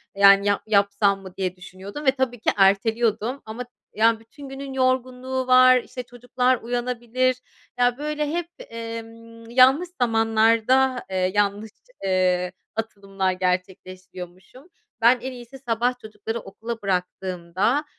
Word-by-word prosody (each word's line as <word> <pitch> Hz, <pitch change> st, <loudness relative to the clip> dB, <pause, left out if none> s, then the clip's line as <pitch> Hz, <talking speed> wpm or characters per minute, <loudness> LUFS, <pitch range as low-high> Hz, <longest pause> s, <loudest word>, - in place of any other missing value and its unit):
Yani, 200 Hz, 0 st, +6 dB
yap 200 Hz, -1 st, +1 dB
yapsam 200 Hz, -1 st, +2 dB
mı 190 Hz, -2 st, -12 dB
diye 185 Hz, -1 st, -2 dB
düşünüyordum 190 Hz, +9 st, -9 dB
ve 265 Hz, -, +6 dB
tabii 260 Hz, -3 st, -2 dB
ki -, -, +1 dB
erteliyordum. 220 Hz, +5 st, +2 dB
Ama, 225 Hz, +3 st, -6 dB, 0.3 s
yani, 225 Hz, +1 st, +3 dB
bütün 270 Hz, +5 st, -13 dB
günün 270 Hz, 0 st, -7 dB
yorgunluğu 255 Hz, 0 st, -1 dB
var, 255 Hz, 0 st, +7 dB
işte, 250 Hz, -, -8 dB
çocuklar 245 Hz, +1 st, 0 dB
uyanabilir. 245 Hz, +1 st, -1 dB, 0.4 s
Ya, 245 Hz, 0 st, +3 dB
böyle, 300 Hz, 0 st, -2 dB
hep, 340 Hz, +1 st, -2 dB, 0.2 s
emm, 230 Hz, 0 st, -9 dB
yanlış 265 Hz, +8 st, +5 dB
zamanlarda, 230 Hz, +3 st, +2 dB
eee, 185 Hz, -1 st, 0 dB
yanlış, 205 Hz, +1 st, 0 dB, 0.3 s
eee, 185 Hz, -1 st, +1 dB, 0.2 s
atılımlar 195 Hz, -4 st, -2 dB
gerçekleştiriyormuşum. 185 Hz, -, -5 dB, 0.3 s
Ben 240 Hz, +2 st, +5 dB
en 260 Hz, -, -5 dB
iyisi 245 Hz, +1 st, -11 dB
sabah 245 Hz, 0 st, -1 dB
çocukları 220 Hz, +1 st, -6 dB
okula 225 Hz, +3 st, -7 dB
bıraktığımda, 185 Hz, -, -1 dB
230 Hz, 125 wpm, -23 LUFS, 195-255 Hz, 0.4 s, var